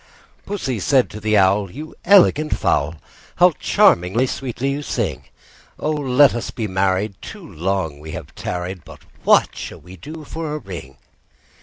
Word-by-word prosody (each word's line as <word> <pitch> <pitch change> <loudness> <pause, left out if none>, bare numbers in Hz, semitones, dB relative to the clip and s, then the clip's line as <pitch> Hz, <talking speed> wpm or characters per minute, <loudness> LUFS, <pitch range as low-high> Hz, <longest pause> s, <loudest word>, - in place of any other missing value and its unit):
II. - - -29
Pussy 135 - -2
said 130 +5 +2
to 105 - -7
the 110 0 +2
Owl, 100 +1 +3
"You 150 - -9
elegant 175 -5 +5
fowl, 75 +4 +1 0.4
How 180 0 +6
charmingly 115 - +3
sweet 130 -1 -5
you 140 +3 -1
sing! - - -3 0.5
Oh! 155 - -1
let 140 -2 +4
us 120 - -4
be 110 -3 -4
married; 95 +2 0
too - - -9
long 85 -3 -2
we 80 +1 -9
have - - -8
tarried: 90 -1 -5
But 80 -4 -13 0.2
what - - +4
shall - - -7
we 90 +2 -13
do 155 - -9
for 155 0 -5
a - - -2
ring?" 85 - -9
110 Hz, 165 wpm, -20 LUFS, 90-145 Hz, 0.5 s, How